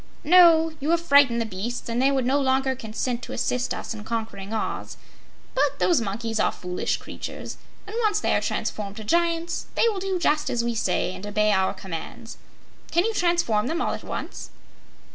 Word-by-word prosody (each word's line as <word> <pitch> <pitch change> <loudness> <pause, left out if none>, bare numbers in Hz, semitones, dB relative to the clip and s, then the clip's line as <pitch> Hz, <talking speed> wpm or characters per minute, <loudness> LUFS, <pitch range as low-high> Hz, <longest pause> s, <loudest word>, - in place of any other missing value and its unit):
"No; 325 -1 +6
you 290 +2 -2
have 340 0 +4
frightened 280 -7 +5
the 230 - 0
beasts, 220 +4 -5
and 235 +1 0
they 270 - +4
would 270 -3 +1
no 270 +3 +2
longer 265 -1 +1
consent 235 +1 -3
to - - -7
assist 250 0 -1
us - - -4
in 215 -1 -8
conquering 220 -3 -4
Oz. 225 - -3 0.6
But - - +1
those 335 -9 +3
monkeys 225 +2 -3
are - - +3
foolish 180 0 -2
creatures, - - -7 0.3
and 415 +2 -8
once 420 -2 +2
they - - +1
are - - +2
transformed 200 -2 -3
to 220 - -6
Giants, 335 +6 0
they - - +4
will 410 -3 -3
do 380 -1 -1
just 305 -3 +1
as 235 -1 0
we 235 0 -1
say 185 -4 0
and 205 - -8
obey 210 +1 +2
our 190 0 +2
commands. 190 +5 -7 0.5
Can 345 +3 +2
you 455 - 0
transform 340 - +1
them 330 +5 -1
all - - 0
at - - -6
once?" - - -6
250 Hz, 195 wpm, -25 LUFS, 215-335 Hz, 0.6 s, No